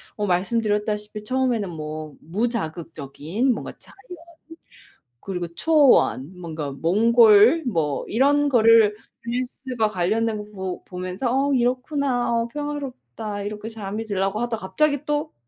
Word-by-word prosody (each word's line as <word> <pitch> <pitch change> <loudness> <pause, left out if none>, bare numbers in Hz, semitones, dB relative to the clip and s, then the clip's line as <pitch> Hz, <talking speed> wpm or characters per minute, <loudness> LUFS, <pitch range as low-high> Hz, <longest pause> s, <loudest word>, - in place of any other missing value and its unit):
어 210 - -2
말씀드렸다시피 210 +2 -1
처음에는 250 -4 0
뭐 155 -2 -7
무자극적인 170 - -2
뭔가 - - -6
자연 - - -18 1.2
그리고 180 0 -4
초원 250 - +3
뭔가 155 -5 -5
몽골 220 - +5
뭐 160 - -1
이런 285 +5 +3
거를 225 -3 +5 0.3
뉴스가 250 -1 -2
관련된 210 +2 -1
거 190 -2 -5
보면서 185 +6 -3
'어 275 +2 +1
이렇구나. 250 0 0
어 230 0 0
평화롭다.' 270 -7 -6
이렇게 210 +1 -5
잠이 220 0 -5
들려고 195 0 -1
하다가 225 -5 -3
갑자기 300 +1 +1
또 295 +1 -2
215 Hz, 275 characters per minute, -23 LUFS, 185-250 Hz, 1.2 s, 몽골